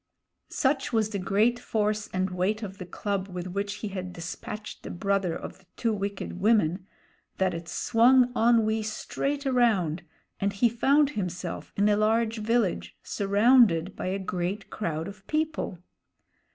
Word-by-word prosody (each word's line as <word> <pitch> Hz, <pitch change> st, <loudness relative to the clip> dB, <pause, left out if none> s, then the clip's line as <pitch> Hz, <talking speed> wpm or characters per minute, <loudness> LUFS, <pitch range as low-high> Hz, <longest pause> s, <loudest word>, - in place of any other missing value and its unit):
Such 270 Hz, -1 st, 0 dB
was 220 Hz, -2 st, +1 dB
the 200 Hz, -, -2 dB
great 210 Hz, +6 st, +2 dB
force 215 Hz, -2 st, -1 dB
and 185 Hz, 0 st, -1 dB
weight 195 Hz, +5 st, -1 dB
of 195 Hz, -2 st, -7 dB
the 185 Hz, -, -7 dB
club 200 Hz, 0 st, -3 dB
with 180 Hz, -2 st, -6 dB
which 200 Hz, +2 st, -3 dB
he -, -, -3 dB
had 185 Hz, -2 st, -5 dB
despatched 210 Hz, +5 st, -7 dB
the -, -, -8 dB
brother 195 Hz, -1 st, 0 dB
of -, -, -8 dB
the 190 Hz, -, -25 dB
two 230 Hz, -2 st, +1 dB
wicked 200 Hz, -2 st, -4 dB
women 190 Hz, -3 st, +2 dB, 0.5 s
that 190 Hz, -1 st, +1 dB
it 165 Hz, 0 st, -6 dB
swung 245 Hz, +2 st, +4 dB
Onwee 225 Hz, -2 st, +3 dB
straight 275 Hz, +6 st, -3 dB
around, 215 Hz, -, +2 dB, 0.4 s
and 200 Hz, 0 st, 0 dB
he 230 Hz, +4 st, +3 dB
found 280 Hz, +5 st, +3 dB
himself 180 Hz, -, -4 dB
in 205 Hz, +1 st, +3 dB
a 210 Hz, -, +4 dB
large 225 Hz, +1 st, +2 dB
village, 220 Hz, -3 st, 0 dB
surrounded 200 Hz, -3 st, +3 dB
by -, -, -4 dB
a 190 Hz, +1 st, -1 dB
great 190 Hz, +1 st, -3 dB
crowd 165 Hz, -5 st, -3 dB
of 200 Hz, 0 st, -11 dB
people. 310 Hz, -, -1 dB
205 Hz, 155 wpm, -27 LUFS, 185-230 Hz, 0.5 s, swung